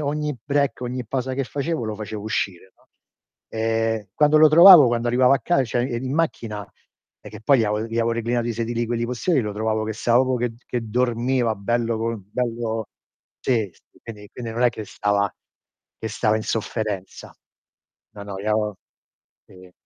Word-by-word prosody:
ogni 150 Hz, 0 st, -2 dB
break, 140 Hz, 0 st, 0 dB
ogni 125 Hz, 0 st, -4 dB
pausa 130 Hz, +2 st, -2 dB
che 135 Hz, +1 st, -1 dB
facevo, 145 Hz, +1 st, -3 dB
lo 110 Hz, -1 st, -3 dB
facevo 105 Hz, 0 st, -6 dB
uscire, 95 Hz, -3 st, -3 dB
no, -, -, -31 dB, 0.6 s
ehm, 115 Hz, -1 st, -1 dB
quando 150 Hz, 0 st, +4 dB
lo 155 Hz, 0 st, +8 dB
trovavo, 170 Hz, -1 st, +9 dB
quando 120 Hz, 0 st, -1 dB
arrivavo 125 Hz, +2 st, +4 dB
a -, -, +1 dB
ca 175 Hz, -6 st, +2 dB
cioè, 120 Hz, +1 st, -1 dB
ehm, 120 Hz, -1 st, -2 dB
in 130 Hz, +1 st, -3 dB
macchina 115 Hz, -10 st, -2 dB, 0.5 s
è -, -, -11 dB
che 105 Hz, 0 st, -11 dB
poi 135 Hz, +4 st, +4 dB
gli -, -, +2 dB
avo 105 Hz, 0 st, 0 dB
gli 115 Hz, 0 st, -6 dB
avevo 115 Hz, 0 st, +1 dB
reclinato 115 Hz, +1 st, -1 dB
i -, -, -1 dB
sedili 120 Hz, +1 st, -2 dB
quelli 120 Hz, 0 st, -1 dB
posteriori, 130 Hz, +6 st, 0 dB
lo 105 Hz, -3 st, -3 dB
trovavo 110 Hz, +1 st, -1 dB
che 110 Hz, -, -3 dB
stava 120 Hz, +1 st, +2 dB
proprio, 130 Hz, -1 st, 0 dB
che 120 Hz, -1 st, -2 dB
che 125 Hz, -, -2 dB
dormiva 120 Hz, 0 st, 0 dB
bello 115 Hz, +2 st, -1 dB
com 115 Hz, -3 st, -3 dB
bello 115 Hz, -2 st, -2 dB, 0.5 s
sì, 115 Hz, -6 st, 0 dB
s -, -, -28 dB, 0.2 s
quindi 105 Hz, -3 st, -10 dB
quindi 120 Hz, -2 st, -6 dB
non 120 Hz, +2 st, -2 dB
è 125 Hz, -, +5 dB
che 110 Hz, -, -7 dB
stava 100 Hz, -1 st, 0 dB, 0.7 s
che 110 Hz, -, -4 dB
stava 110 Hz, 0 st, +1 dB
in 110 Hz, -, -3 dB
sofferenza. 105 Hz, -3 st, -4 dB, 0.8 s
No, 100 Hz, -, -8 dB
no, 100 Hz, -1 st, -7 dB
iao 105 Hz, 0 st, -1 dB, 0.7 s
i 90 Hz, -1 st, -16 dB
115 Hz, 185 wpm, -23 LUFS, 110-125 Hz, 0.8 s, trovavo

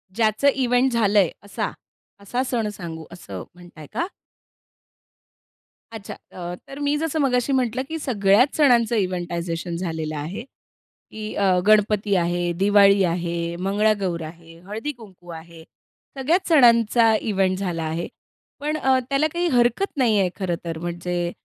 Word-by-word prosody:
ज्याचं 220 Hz, +4 st, +2 dB
इव्हेंट 255 Hz, 0 st, +2 dB
झालंय, 205 Hz, -5 st, +3 dB
असा? 205 Hz, -, -4 dB, 0.5 s
असा 245 Hz, +6 st, -2 dB
सण 235 Hz, -4 st, -1 dB
सांगू, 165 Hz, -5 st, -8 dB
असं 100 Hz, -, -8 dB
म्हणताय 175 Hz, -4 st, -13 dB
का? 340 Hz, -, -1 dB, 1.9 s
अच्छा, 200 Hz, -3 st, -7 dB
अ, 175 Hz, -1 st, -8 dB
तर 275 Hz, +1 st, -9 dB
मी 290 Hz, 0 st, 0 dB
जसं 315 Hz, 0 st, -2 dB
मगाशी 255 Hz, -2 st, +1 dB
म्हटलं 255 Hz, -1 st, 0 dB
की 320 Hz, -, -3 dB
सगळ्याच 225 Hz, -2 st, +3 dB
सणांचं 240 Hz, -6 st, +4 dB
इव्हेंटायझेशन 175 Hz, -3 st, -2 dB
झालेलं 160 Hz, -3 st, -4 dB
आहे, 165 Hz, +10 st, -5 dB, 0.7 s
की 215 Hz, 0 st, -6 dB
अ, 190 Hz, -3 st, +2 dB
गणपती 210 Hz, -1 st, +3 dB
आहे, 175 Hz, 0 st, 0 dB
दिवाळी 200 Hz, 0 st, +5 dB
आहे, 170 Hz, -1 st, -2 dB
मंगळागौर 200 Hz, -4 st, +1 dB
आहे, 165 Hz, +1 st, -12 dB
हळदी-कुंकू 215 Hz, -5 st, -8 dB
आहे. 165 Hz, 0 st, -10 dB, 0.5 s
सगळ्याच 320 Hz, +8 st, +1 dB
सणांचा 235 Hz, -5 st, +5 dB, 0.2 s
इव्हेंट 190 Hz, -1 st, +1 dB
झाला 175 Hz, -4 st, -3 dB
आहे. 160 Hz, +2 st, -3 dB, 0.5 s
पण 300 Hz, +2 st, -2 dB
अ, 265 Hz, -3 st, +3 dB
त्याला 275 Hz, +3 st, +2 dB
काही 345 Hz, +1 st, 0 dB
हरकत 245 Hz, +10 st, +1 dB
नाही 230 Hz, -6 st, +3 dB
आहे 185 Hz, -2 st, +2 dB
खरं 185 Hz, -3 st, -2 dB
तर 165 Hz, -1 st, -4 dB
म्हणजे 175 Hz, 0 st, -3 dB
200 Hz, 135 wpm, -23 LUFS, 175-245 Hz, 1.9 s, दिवाळी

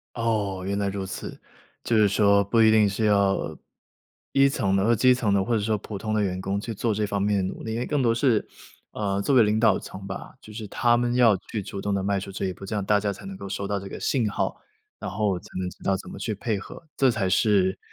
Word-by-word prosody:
哦， 105 Hz, -5 st, -1 dB
原 100 Hz, +1 st, -1 dB
来 100 Hz, -1 st, 0 dB
如 95 Hz, -1 st, -4 dB
此。 95 Hz, -, -7 dB, 0.4 s
就 115 Hz, -, 0 dB
是 105 Hz, -1 st, +5 dB
说， 100 Hz, 0 st, +4 dB
不 115 Hz, +4 st, +2 dB
一 110 Hz, -, +7 dB
定 110 Hz, -2 st, +5 dB
是 105 Hz, +3 st, -1 dB
要 100 Hz, -2 st, +1 dB, 0.7 s
一 140 Hz, 0 st, +5 dB
层 110 Hz, -9 st, 0 dB
的 95 Hz, -, +2 dB
或 115 Hz, +3 st, +3 dB
基 125 Hz, +3 st, +5 dB
层 115 Hz, -5 st, 0 dB
的， 100 Hz, -1 st, +3 dB
或 120 Hz, -, -1 dB
者 -, -, +2 dB
说 110 Hz, +1 st, 0 dB
普 105 Hz, +1 st, -7 dB
通 110 Hz, +2 st, -3 dB
的 110 Hz, -, +2 dB
员 95 Hz, -2 st, -1 dB
工 100 Hz, +1 st, -2 dB
去 115 Hz, +2 st, -5 dB
做 110 Hz, +2 st, -1 dB
这 105 Hz, +1 st, 0 dB
方 100 Hz, -1 st, -2 dB
面 105 Hz, 0 st, +2 dB
的 95 Hz, -, 0 dB
努 -, -, -11 dB
力， 110 Hz, -, -4 dB
因 115 Hz, -, -2 dB
为 125 Hz, -, -2 dB
更 145 Hz, -2 st, 0 dB
多 115 Hz, -2 st, +3 dB
是， 115 Hz, -2 st, +2 dB, 0.5 s
呃， 100 Hz, -2 st, -1 dB
作 135 Hz, +6 st, +1 dB
为 120 Hz, -, +7 dB
领 105 Hz, +1 st, +1 dB
导 110 Hz, -4 st, +4 dB
层 95 Hz, 0 st, -9 dB
吧， 95 Hz, -1 st, -7 dB
就 110 Hz, -, -13 dB
是 105 Hz, 0 st, -7 dB
他 120 Hz, +4 st, +2 dB
们 120 Hz, 0 st, 0 dB
要 115 Hz, -5 st, +5 dB
去 110 Hz, -, -2 dB
主 100 Hz, -, -7 dB
动 100 Hz, +1 st, -2 dB
地 100 Hz, -1 st, -1 dB
迈 100 Hz, 0 st, 0 dB
出 100 Hz, +1 st, -7 dB
这 95 Hz, -, -3 dB
一 95 Hz, -, -2 dB
步， 95 Hz, -, -10 dB
这 105 Hz, -, -4 dB
样 100 Hz, -, -1 dB
大 105 Hz, +1 st, +3 dB
家 100 Hz, 0 st, -1 dB
才 -, -, -12 dB
能 195 Hz, 0 st, -7 dB
够 -, -, -7 dB
收 100 Hz, 0 st, -4 dB
到 100 Hz, 0 st, -1 dB
这 100 Hz, -, -8 dB
个 -, -, -7 dB
信 120 Hz, -6 st, 0 dB
号， -, -, -2 dB, 0.4 s
然 -, -, -4 dB
后 100 Hz, -2 st, 0 dB
才 -, -, -19 dB
能 90 Hz, -1 st, -2 dB
知 -, -, -16 dB
道 95 Hz, -, +2 dB
怎 95 Hz, -, -7 dB
么 -, -, -9 dB
去 110 Hz, -3 st, -3 dB
配 110 Hz, 0 st, -2 dB
合。 105 Hz, -, -11 dB
这 135 Hz, -, +4 dB
才 110 Hz, -6 st, 0 dB
是， 95 Hz, -1 st, +2 dB
105 Hz, 300 characters per minute, -25 LUFS, 100-115 Hz, 0.7 s, 一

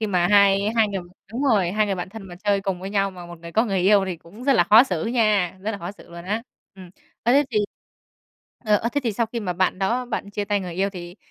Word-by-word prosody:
khi 220 Hz, -, 0 dB
mà 180 Hz, -4 st, +2 dB
hai 200 Hz, -1 st, +6 dB, 0.2 s
hai 220 Hz, -2 st, +4 dB
người 195 Hz, -2 st, -3 dB, 0.3 s
đúng 250 Hz, -, -3 dB
rồi, 205 Hz, -10 st, +2 dB
hai 215 Hz, 0 st, +2 dB
người 195 Hz, -, -1 dB
bạn 180 Hz, 0 st, -5 dB
thân 220 Hz, +1 st, -9 dB
mà 175 Hz, -, -9 dB
chơi 200 Hz, -1 st, +2 dB
cùng 190 Hz, -2 st, -3 dB
với 190 Hz, +1 st, -6 dB
nhau 195 Hz, -1 st, +1 dB
mà 180 Hz, -2 st, -10 dB
một 175 Hz, -1 st, -11 dB
người 170 Hz, 0 st, -10 dB
có 220 Hz, +5 st, +3 dB
người 195 Hz, -5 st, -1 dB
yêu 195 Hz, +2 st, +4 dB
thì 185 Hz, -2 st, -3 dB
cũng 200 Hz, +10 st, -13 dB
rất 280 Hz, -, +4 dB
là 205 Hz, -9 st, +4 dB
khó 215 Hz, +7 st, +8 dB
xử 180 Hz, -11 st, -2 dB
nha, 215 Hz, -6 st, +1 dB
rất 215 Hz, -, -2 dB
là 205 Hz, -, -5 dB
khó 175 Hz, +1 st, -6 dB
xử -, -, -17 dB
luôn 170 Hz, 0 st, -9 dB
á. 215 Hz, +4 st, -2 dB, 0.3 s
Ừm, 185 Hz, -2 st, -12 dB, 0.3 s
ơ, 240 Hz, -, +3 dB
thế 285 Hz, +2 st, +5 dB
thì 215 Hz, -, +1 dB, 1.1 s
ờ, 210 Hz, -1 st, +4 dB
ơ, 225 Hz, -, -1 dB
thế 285 Hz, -, 0 dB
thì 230 Hz, -, 0 dB
sau 230 Hz, +3 st, 0 dB
khi 230 Hz, +1 st, -5 dB
mà 185 Hz, -4 st, -2 dB
bạn 185 Hz, +1 st, 0 dB
đó 235 Hz, +6 st, 0 dB
bạn 215 Hz, -4 st, -4 dB
chia 205 Hz, 0 st, -3 dB
tay 205 Hz, -1 st, 0 dB
người 180 Hz, -2 st, -6 dB
yêu 195 Hz, +2 st, 0 dB
thì 175 Hz, -1 st, -9 dB
200 Hz, 285 wpm, -23 LUFS, 185-220 Hz, 1.1 s, khó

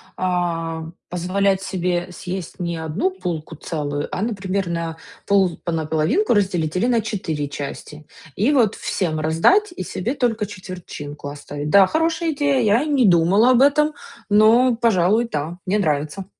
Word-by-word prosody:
а, 170 Hz, -3 st, -2 dB, 0.3 s
позволять 190 Hz, +2 st, 0 dB
себе 180 Hz, -2 st, -2 dB
съесть 180 Hz, -1 st, -6 dB
не 170 Hz, -1 st, -3 dB
1 160 Hz, +4 st, -1 dB
булку 165 Hz, -3 st, -4 dB
целую, 145 Hz, -2 st, -4 dB
а, -, -, -3 dB
например, 195 Hz, -4 st, -2 dB
на 165 Hz, -1 st, -3 dB, 0.3 s
пол 195 Hz, -3 st, +2 dB
на 165 Hz, -2 st, -1 dB
половинку 160 Hz, -, +1 dB
разделить 180 Hz, -6 st, 0 dB
или 185 Hz, -, +1 dB
на 240 Hz, -2 st, +2 dB
4 160 Hz, -9 st, -3 dB
части. 145 Hz, +1 st, -7 dB, 0.3 s
И 220 Hz, +9 st, +2 dB
вот 240 Hz, -8 st, +3 dB
всем 160 Hz, -5 st, -2 dB
раздать 165 Hz, -, +3 dB
и -, -, -4 dB
себе 225 Hz, +8 st, -3 dB
только 230 Hz, -6 st, 0 dB
четвертинку 175 Hz, -7 st, -8 dB
оставить. 145 Hz, +1 st, -6 dB
Да, 195 Hz, -1 st, +7 dB
хорошая 325 Hz, -, 0 dB
идея, 285 Hz, -2 st, +1 dB
я 225 Hz, +5 st, +3 dB
не 280 Hz, -7 st, +3 dB
думала 185 Hz, +6 st, +4 dB
об 250 Hz, 0 st, +4 dB
этом, 300 Hz, +2 st, +4 dB, 0.4 s
но, 230 Hz, +4 st, +5 dB
пожалуй, 225 Hz, 0 st, +2 dB
да. 155 Hz, +4 st, -3 dB
Мне 205 Hz, +3 st, +1 dB
нравится. 155 Hz, +3 st, -1 dB
185 Hz, 150 wpm, -21 LUFS, 165-225 Hz, 0.4 s, Да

